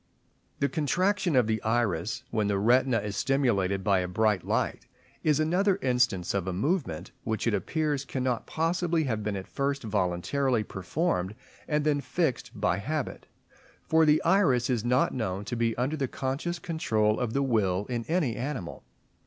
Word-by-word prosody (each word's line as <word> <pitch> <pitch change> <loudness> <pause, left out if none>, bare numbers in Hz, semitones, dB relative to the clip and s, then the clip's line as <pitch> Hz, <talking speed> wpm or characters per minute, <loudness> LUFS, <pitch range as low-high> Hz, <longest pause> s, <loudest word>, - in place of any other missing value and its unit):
The 140 - +1
contraction 180 +3 +1
of 125 -3 +5
the 110 0 -1
iris, 110 -4 0
when 110 -2 +1
the 100 -1 +1
retina 120 +4 +3
is 105 -1 -4
stimulated 100 -9 +1
by 95 -1 +3
a 90 - -1
bright 105 0 +1
light, - - -1 0.4
is 150 -2 +3
another 180 +5 +2
instance 125 -8 +1
of 95 -2 -1
a 95 - -1
movement, 135 - -1
which 110 -1 -2
it 115 - +2
appears 145 - -1
cannot 130 -3 -2
possibly 165 0 0
have 110 -6 -1
been 105 -1 -2
at 95 -1 -5
first 140 0 -2
voluntarily 110 +5 0
performed 100 - -2 0.3
and 150 -1 0
then 145 -2 +2
fixed 160 -4 -2
by 90 - +1
habit; 145 +7 -4 0.6
for 160 0 +3
the 150 0 +4
iris 150 -10 +3
is 120 -4 0
not 125 +2 +2
known 105 -5 -3
to 120 - -3
be 115 -1 0
under 130 +5 0
the 140 -3 -1
conscious 140 +8 -3
control 110 - 0
of 120 -2 -2
the 140 - +1
will 105 -7 +1
in 120 -1 -3
any 160 -9 +1
animal. 125 -9 -5
125 Hz, 170 wpm, -28 LUFS, 105-150 Hz, 0.6 s, of